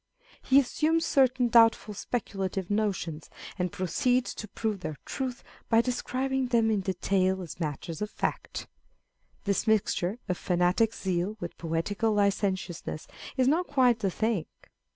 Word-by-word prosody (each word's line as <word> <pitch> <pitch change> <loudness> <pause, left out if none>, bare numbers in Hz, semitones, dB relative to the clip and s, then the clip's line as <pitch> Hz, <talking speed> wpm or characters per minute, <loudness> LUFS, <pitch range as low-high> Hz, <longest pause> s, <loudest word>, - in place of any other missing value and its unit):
He 265 +1 +5
assumes 320 +5 +1
certain 260 -4 +3
doubtful 225 -2 +5
speculative 195 -4 -3
notions, 190 -7 -1 0.3
and 180 -1 0
proceeds 245 +8 0
to 215 - -7
prove 215 0 -2
their 155 -4 -5
truth 255 -3 -4 0.3
by 225 - +5
describing 260 +2 -1
them 230 -2 +3
in 210 - +2
detail 190 0 +1
as 170 - -9
matters 160 +2 -4
of 210 - -1
fact. - - -3 0.8
This 200 +2 0
mixture 210 -2 +1
of 180 - -2
fanatic 180 +5 +2
zeal 190 +3 -1
with 175 -2 -6
poetical 195 +7 -1
licen 200 -1 +2
tiousness 175 -4 -6 0.3
is 255 -1 +3
not 335 +6 +2
quite 255 -5 +3
the 200 - +1
thing. 215 -2 -1
210 Hz, 140 wpm, -28 LUFS, 185-245 Hz, 0.8 s, He